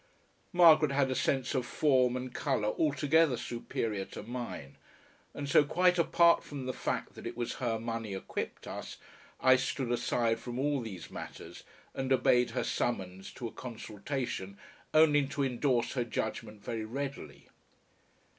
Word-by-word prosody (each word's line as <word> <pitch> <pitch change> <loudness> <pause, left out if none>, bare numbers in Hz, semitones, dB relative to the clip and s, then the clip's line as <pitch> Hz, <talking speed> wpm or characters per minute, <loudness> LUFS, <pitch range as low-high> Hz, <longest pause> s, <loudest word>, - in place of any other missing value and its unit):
Margaret 160 -4 +7
had 135 -1 +2
a - - 0
sense 130 0 0
of 130 -3 +1
form 130 -2 +2
and 125 0 -6
colour 130 -8 0
altogether 145 +1 +2
superior 115 -4 -3
to - - -9
mine, 115 - -6 0.6
and 145 - -4
so 140 - +6
quite 180 +4 +3
apart 170 0 +5
from 140 -3 -7
the 130 - -2
fact - - -3
that - - -8
it - - -7
was 120 -1 -3
her 115 -3 0
money 115 -3 -4
equipped 95 - -5
us, - - -7 0.4
I 130 0 +6
stood 130 -1 -2
aside 115 -1 +1
from 120 -1 -6
all 140 0 +1
these 95 -7 -8
matters - - -8 0.3
and 135 0 -3
obeyed 125 -1 +4
her - - +1
summons 95 -5 -2
to 120 - -5
a - - -8
consultation 115 -3 -5 0.3
only 150 -3 +5
to 140 0 -2
endorse 125 -1 +1
her 125 - 0
judgment 110 -2 -4
very 115 -1 -3
readily. 135 +5 -6
125 Hz, 155 wpm, -31 LUFS, 115-140 Hz, 0.6 s, Margaret